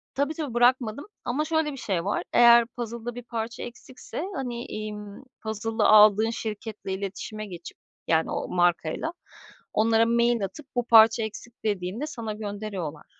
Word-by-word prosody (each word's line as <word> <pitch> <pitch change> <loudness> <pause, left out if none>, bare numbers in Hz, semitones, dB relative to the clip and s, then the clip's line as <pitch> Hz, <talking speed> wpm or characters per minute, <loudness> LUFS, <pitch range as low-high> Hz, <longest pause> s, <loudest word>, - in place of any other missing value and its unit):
Tabii, 285 +3 0
tabii 295 -6 -5
bırakmadım 245 +1 +2 0.2
ama 275 +5 0
şöyle 315 -1 0
bir 275 - -8
şey 185 -7 -2
var, 200 - -1
eğer 235 -1 +7
puzzle'da 235 0 -5
bir 245 - -7
parça 230 0 -5
eksikse, 255 +5 -8
hani, 240 -2 -4
imm, 210 +1 -7 0.2
puzzle'ı 220 +1 -2
aldığın 215 +1 +7
şirketle 215 -3 -5
iletişime 200 +2 -5
geçip 175 -4 -10 0.3
-yani 160 -1 +2
o - - -3
markayla 175 - 0 0.6
onlara 225 +1 +4
mail 235 -2 +2
atıp, 270 +10 -10
bu 245 -1 0
parça 225 0 +7
eksik 220 +2 -7
dediğinde 205 +6 -2
sana 230 -7 -5
gönderiyorlar. 205 -7 -5
225 Hz, 145 wpm, -26 LUFS, 210-240 Hz, 0.6 s, eğer